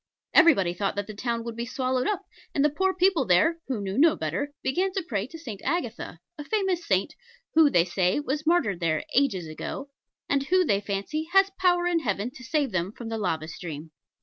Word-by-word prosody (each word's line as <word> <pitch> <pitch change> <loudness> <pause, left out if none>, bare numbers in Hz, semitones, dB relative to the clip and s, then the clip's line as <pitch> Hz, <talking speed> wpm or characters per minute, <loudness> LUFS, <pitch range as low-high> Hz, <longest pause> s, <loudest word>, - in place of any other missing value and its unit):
Everybody 195 - +5
thought 195 +2 -2
that 205 0 -2
the 215 - -8
town 235 +2 -2
would 235 -1 -6
be 235 - -3
swallowed 255 0 -1
up; 400 -2 -1 0.3
and 280 - +3
the 300 - +3
poor 380 +5 +1
people 370 -5 +2
there 310 - +3
(who 260 -5 -2
knew 195 +4 -2
no 320 +1 +6
better) 170 - -3
began 370 +8 +1
to 380 - -1
pray 205 -2 -2
to 325 - -10
St. 230 -12 -8
Agatha 245 - -3 0.2
a - - -4
famous 380 0 0
saint, 195 +9 +1 0.4
who, 315 -2 +6
they 175 -9 +3
say, 180 +4 +1
was 295 +1 -3
martyred 265 - +2
there 160 -3 0
ages 245 -10 +2
ago 160 - -6 0.4
and 280 -1 +2
who, 365 +2 +3
they 200 -7 +2
fancy, 205 +11 -3
has 390 0 +5
power 355 -1 +3
in 350 -1 +2
heaven 210 -3 -2
to 255 - -13
save 280 0 0
them 185 0 -1
from 225 +1 -8
the 225 - -2
lava 160 -6 -1
stream. 160 -2 -7
255 Hz, 210 wpm, -26 LUFS, 195-325 Hz, 0.4 s, no